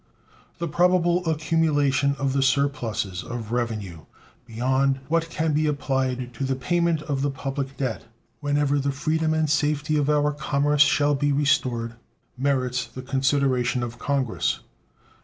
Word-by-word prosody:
The 170 -1 -3
probable 175 +2 +2
accumulation 145 -3 +1
of 135 -1 -1
the 135 - +1
surpluses 125 -8 0
of 115 -2 -6
revenue 105 -9 -3 0.4
beyond 130 +4 +1
what 165 +1 +1
can 160 -1 -1
be 155 +1 +2
applied 130 -4 -1
to 120 - -5
the 135 0 0
payment 170 +3 0
of 140 -3 -2
the 145 - +1
public 135 0 -4
debt 130 -5 -3 0.3
whenever 145 -1 +1
the 140 0 0
freedom 155 +3 0
and 155 -1 +1
safety 150 +1 +1
of 145 0 +1
our 150 0 +3
commerce 145 0 +1
shall 145 0 +4
be 145 +1 +1
restored 125 -5 +1 0.4
merits 130 -2 0
the 130 +2 -9
consideration 130 -2 +1
of 120 0 -6
Congress. 135 -5 -1
140 Hz, 140 wpm, -24 LUFS, 130-150 Hz, 0.4 s, shall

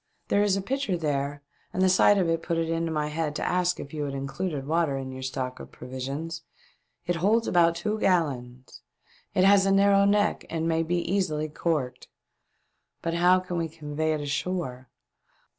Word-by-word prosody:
There 200 - +3
is 200 -2 +2
a 195 - -3
pitcher 260 -5 -1
there 145 -2 -2 0.3
and 185 - 0
the - - +5
sight 185 +2 +5
of 185 -3 +2
it 165 0 0
put 165 0 -2
it 165 0 0
into 165 0 -1
my 150 -1 -1
head 150 -1 -2
to - - -2
ask 180 0 +1
if 140 - -8
you 155 - -3
had 140 -1 -4
included 140 +2 -3
water 160 -2 +1
in 130 -1 -5
your 130 0 -7
stock 130 -1 -4
of - - -10
provisions. 140 +6 -5 0.6
It 175 0 0
holds 215 +7 +2
about 170 -1 +4
two 210 +5 -2
gallons. 130 - -1 0.5
It 185 - +4
has 195 0 +6
a - - +3
narrow 200 0 +5
neck 205 +1 +2
and 165 0 -2
may 165 0 +2
be 165 +2 -1
easily 170 -4 -1
corked. 145 -6 -2 1.0
But 165 - -1
how 180 +2 +4
can 180 -1 -4
we 165 -1 -1
convey 155 0 -2
it 155 - -2
ashore. 145 -3 -3
165 Hz, 190 wpm, -27 LUFS, 145-185 Hz, 1.0 s, has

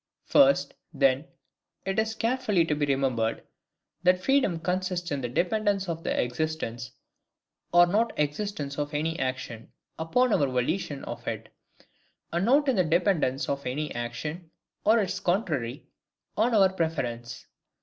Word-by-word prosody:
First, 275 -1 +4 0.2
then, 135 -1 +2 0.6
it 195 +2 0
is 220 0 0
carefully 225 -8 +1
to 155 - 0
be 145 -1 0
remembered, 130 -5 0 0.6
That 180 0 +4
freedom 270 -11 +2
consists 180 0 -2
in 140 -2 -1
the 120 - -3
dependence 195 - 0
of 165 -1 -4
the - - -1
existence, 125 -3 -3 0.8
or 175 0 +7
not 215 +6 +1
existence 150 -1 -2
of 145 +1 -3
any 160 +2 -1
ACTION, 130 -3 -4 0.3
upon 230 +9 +2
our 140 - +3
VOLITION 135 +4 -1
of - - -7
it; - - -4 0.8
and 170 +3 +1
not 280 +5 +4
in 265 - +2
the 185 - +4
dependence 160 -5 +1
of 140 0 -2
any 150 +4 -3
action, 135 +9 -5 0.3
or 220 +2 +5
its 200 -5 0
contrary, 155 - -1 0.5
on 230 +2 +2
our 190 -2 +5
PREFERENCE. 120 -9 -3
165 Hz, 140 wpm, -27 LUFS, 135-195 Hz, 0.8 s, or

